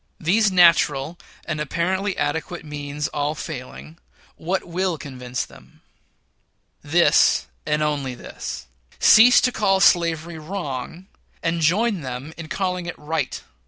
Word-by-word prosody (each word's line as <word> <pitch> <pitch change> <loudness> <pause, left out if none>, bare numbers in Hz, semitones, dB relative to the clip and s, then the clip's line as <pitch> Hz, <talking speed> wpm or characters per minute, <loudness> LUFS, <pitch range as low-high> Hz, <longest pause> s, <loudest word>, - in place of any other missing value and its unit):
These 200 +5 +2
natural 170 -3 +4 0.3
and 155 -2 -3
apparently 185 +6 -1
adequate 160 +3 -3
means 145 0 -4
all 145 +1 -2
failing, 155 +2 -8 0.4
what 185 +4 -2
will 180 0 -2
convince 125 -4 -5
them? 65 +1 -19 1.0
This, 170 +4 +3 0.2
and 150 0 +1
this - - +2
only: 140 -4 -2 0.8
cease 240 +3 +7
to 250 - +2
call 195 -4 +2
slavery 170 -2 +2
wrong, 160 -1 -6 0.4
and 165 0 0
join 195 +4 +2
them 130 +3 -6
in 165 -2 -8
calling 180 -1 -2
it 175 - -6
right. 160 +2 -3
160 Hz, 125 wpm, -22 LUFS, 145-180 Hz, 1.0 s, cease